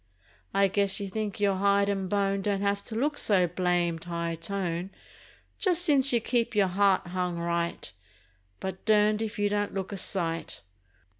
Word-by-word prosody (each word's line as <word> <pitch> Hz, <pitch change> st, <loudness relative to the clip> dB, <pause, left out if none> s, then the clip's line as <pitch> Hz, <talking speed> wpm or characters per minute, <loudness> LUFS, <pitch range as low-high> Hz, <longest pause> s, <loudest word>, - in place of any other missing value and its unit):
I 195 Hz, 0 st, +3 dB
guess 200 Hz, +1 st, +2 dB
you 200 Hz, -1 st, -4 dB
think 210 Hz, 0 st, -4 dB
your 200 Hz, -2 st, +2 dB
hide 200 Hz, +1 st, +3 dB
and 195 Hz, -2 st, -2 dB
bone 195 Hz, 0 st, 0 dB
Don't 200 Hz, 0 st, -1 dB
have 200 Hz, 0 st, 0 dB
to 220 Hz, -, -6 dB
look 290 Hz, +5 st, 0 dB
so 190 Hz, -4 st, +3 dB
blamed 175 Hz, -1 st, -1 dB
high 170 Hz, -1 st, -3 dB
tone 175 Hz, +1 st, -3 dB, 0.7 s
Just 355 Hz, -3 st, +2 dB
since 280 Hz, -5 st, +4 dB
you 240 Hz, -, +3 dB
keep 235 Hz, 0 st, -1 dB
your 200 Hz, -3 st, +3 dB
heart 195 Hz, +1 st, +2 dB
hung 180 Hz, -1 st, -2 dB
right,— 170 Hz, -, -2 dB, 0.7 s
But 190 Hz, 0 st, -6 dB
durned 210 Hz, 0 st, +3 dB
if 220 Hz, 0 st, -4 dB
you 205 Hz, 0 st, +1 dB
don't 205 Hz, 0 st, -1 dB
look 190 Hz, 0 st, -3 dB
a 200 Hz, -, -4 dB
sight. 165 Hz, -, -2 dB
195 Hz, 170 wpm, -28 LUFS, 180-210 Hz, 0.7 s, since